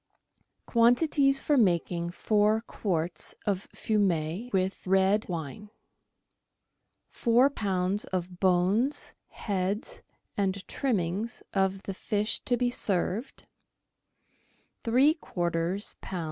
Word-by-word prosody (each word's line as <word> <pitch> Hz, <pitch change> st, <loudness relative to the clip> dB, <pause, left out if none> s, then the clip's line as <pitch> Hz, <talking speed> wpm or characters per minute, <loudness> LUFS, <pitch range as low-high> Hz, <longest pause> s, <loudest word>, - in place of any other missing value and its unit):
Quantities 275 Hz, +4 st, +3 dB
for 295 Hz, -, +1 dB
making 175 Hz, -5 st, +1 dB
Four 210 Hz, +4 st, +2 dB
Quarts 175 Hz, -6 st, -3 dB
of 200 Hz, -2 st, -1 dB
Fumet 195 Hz, +1 st, -1 dB
with 190 Hz, 0 st, -1 dB
Red 195 Hz, +3 st, +3 dB
Wine. 170 Hz, +5 st, -5 dB, 0.7 s
— -, -, -53 dB
Four 245 Hz, +3 st, +3 dB
lbs. 195 Hz, -3 st, -1 dB
of 180 Hz, -1 st, -4 dB
bones, 190 Hz, +9 st, +2 dB
heads, 205 Hz, -, -3 dB, 0.3 s
and 195 Hz, -1 st, -1 dB
trimmings 215 Hz, -, -2 dB
of 195 Hz, 0 st, 0 dB
the 195 Hz, -, -4 dB
fish 210 Hz, +3 st, -1 dB
to 245 Hz, -, +1 dB
be 245 Hz, 0 st, +1 dB
served; 200 Hz, +2 st, -2 dB, 1.4 s
three 260 Hz, +6 st, +4 dB
quarters 175 Hz, -, -1 dB
lb. 185 Hz, -, -5 dB
200 Hz, 100 wpm, -28 LUFS, 180-230 Hz, 1.4 s, three